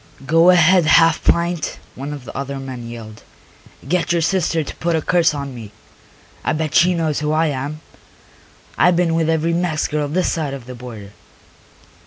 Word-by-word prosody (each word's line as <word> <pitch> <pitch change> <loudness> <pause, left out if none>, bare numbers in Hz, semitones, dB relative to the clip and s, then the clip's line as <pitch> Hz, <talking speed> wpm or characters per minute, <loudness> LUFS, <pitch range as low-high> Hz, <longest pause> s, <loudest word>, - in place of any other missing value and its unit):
"Go 165 +4 +5
ahead, 180 -1 +5
half 165 0 +4
pint," 170 -1 0 0.2
one 140 +3 -6
of 145 -4 -8
the - - -10
other 140 0 -4
men 130 -3 -7
yelled. 110 -2 -10 0.7
"Get 175 +3 0
your 170 -1 +1
sister 165 -1 0
to - - -8
put 170 0 0
a 160 - 0
curse 170 -4 +2
on 140 -2 -5
me. 110 -4 -9 0.7
I - - 0
bet 155 -1 -2
she 180 +1 +4
knows 160 -3 -1
who 150 0 -1
I 160 +1 +2
am; 145 +3 -4 1.0
I - - +6
been 175 -1 +1
with 165 -1 +1
every 165 +1 +1
Mex 170 -3 0
girl 150 -1 -2
this 180 +6 0
side 150 -4 -2
of 130 -4 -10
the 125 - -8
border." 115 -5 -10
155 Hz, 185 wpm, -19 LUFS, 135-170 Hz, 1.0 s, I